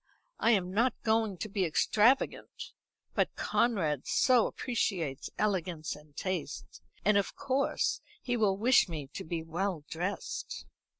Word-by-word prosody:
I - - +3
am 185 -3 +1
not 235 +4 +2
going 220 -3 +1
to 215 - -4
be 200 -2 -1
extravagant, 215 - +2 0.4
but - - 0
Conrad 165 - 0
so 250 -3 +4
appreciates 180 - -2
elegance 180 -6 -1
and 150 -1 -17
taste; 185 -6 -4 0.2
and 210 0 +5
of 200 - 0
course 270 +1 0 0.2
he 245 - -2
will 205 -4 +2
wish 235 -1 +4
me 150 -5 -5
to - - -5
be 165 0 -3
well 170 0 -2
dressed." 200 - -4
195 Hz, 135 wpm, -31 LUFS, 165-225 Hz, 0.4 s, and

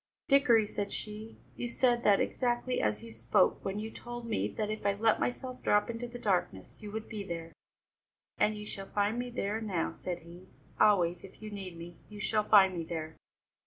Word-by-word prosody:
"Dickory," 255 -6 +5
said 205 -1 -3
she, 215 +1 -6 0.2
"you 240 - -3
said 240 0 +2
that 200 -1 +5
exactly 245 0 0
as 105 0 0
you 115 - -9
spoke 115 - +2
when 195 +1 -2
you 220 +1 -4
told 240 0 -7
me 225 -2 0
that 215 -1 -3
if 215 - -4
I 200 0 +3
let 220 +2 +3
myself 255 0 -3
drop 205 +3 +3
into 235 +1 -5
the 240 0 -8
darkness, 180 - -1
you 210 - -7
would 220 +1 -5
be 215 -3 -5
there." 165 -3 -6 0.9
"And 215 - +3
you 210 - -7
shall 195 -2 -7
find 205 +4 0
me 245 0 -3
there 220 -2 -2
now," 190 -7 -1
said 175 -2 -5
he; 175 +2 -13 0.3
"always, 180 -4 +4
if 195 - -13
you 215 -1 -7
need 190 -4 -6
me, 170 0 -9
you 210 -1 -9
shall 215 +1 +1
find 190 -3 +7
me 170 - -2
there!" 160 -1 -5
210 Hz, 200 wpm, -31 LUFS, 180-225 Hz, 0.9 s, find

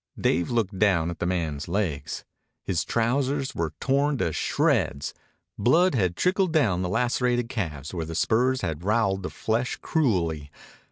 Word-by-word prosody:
Dave 85 - +1
looked 110 -5 -1
down 85 -5 +3
at 85 - -8
the 85 - -1
man's 80 -5 -2
legs. 85 -6 -2 0.4
His 90 -4 0
trousers 135 +4 0
were 80 -2 -3
torn 140 +1 +1
to 85 -8 -1
shreds. 70 -1 0 0.5
Blood 165 - +4 0.2
trickled 185 - +1
down 115 - +2
the 90 - -1
lacerated 120 +2 +1
calves 80 - -4
where 85 -3 -3
the 80 - -5
spurs 125 +8 +2
had 80 -2 -2
roweled 100 -2 +1
the 95 - -4
flesh 115 +3 -1
cruelly. 85 - 0
105 Hz, 150 wpm, -26 LUFS, 85-125 Hz, 0.5 s, Blood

